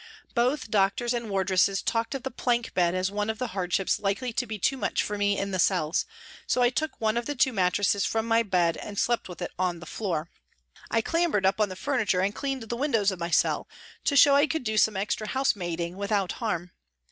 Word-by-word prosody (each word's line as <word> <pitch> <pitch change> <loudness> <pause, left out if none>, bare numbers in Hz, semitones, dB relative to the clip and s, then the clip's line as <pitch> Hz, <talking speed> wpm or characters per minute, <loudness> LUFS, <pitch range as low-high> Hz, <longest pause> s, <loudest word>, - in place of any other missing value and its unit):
Both 245 -1 0
doctors 210 +4 +2
and 235 -2 -3
wardresses 195 0 +2
talked 230 +3 -1
of 265 - -5
the 265 - -4
plank 240 -1 -1
bed 175 -1 +2
as 185 +1 0
one 210 +1 -2
of 220 - -2
the 250 +1 -3
hardships 185 0 0
likely 210 +5 -1
to 250 +2 -1
be 215 - -4
too 240 +7 +1
much 265 - -1
for 210 - -3
me 205 0 +1
in 200 0 -2
the 185 - -2
cells, 170 -3 +1 0.4
so 250 - +2
I 245 - +4
took 310 +4 -3
one 220 0 +1
of 235 - -2
the 290 - -2
two 265 0 +2
mattresses 195 +1 +2
from 225 0 0
my 230 0 +4
bed 180 -6 +1
and 205 -1 -8
slept 240 -2 0
with 175 - -7
it - - -4
on 180 -2 0
the 170 - -10
floor. 170 -6 -3 0.6
I 225 - +2
clambered 330 - +1
up 195 +3 +2
on 210 - +2
the 185 - -6
furniture 220 -5 0
and 195 +2 0
cleaned 270 -1 -3
the 225 +1 -4
windows 230 -7 +1
of 185 - -7
my 170 0 -3
cell - - +1 0.4
to 285 - +2
show 280 0 +7
I 285 +2 +5
could 320 -2 -2
do 220 -2 -2
some 215 -1 +3
extra 210 +2 -2
liousemaiding 175 -10 -1
without 200 -1 -1
harm. 180 -7 -3
210 Hz, 230 wpm, -27 LUFS, 190-240 Hz, 0.6 s, show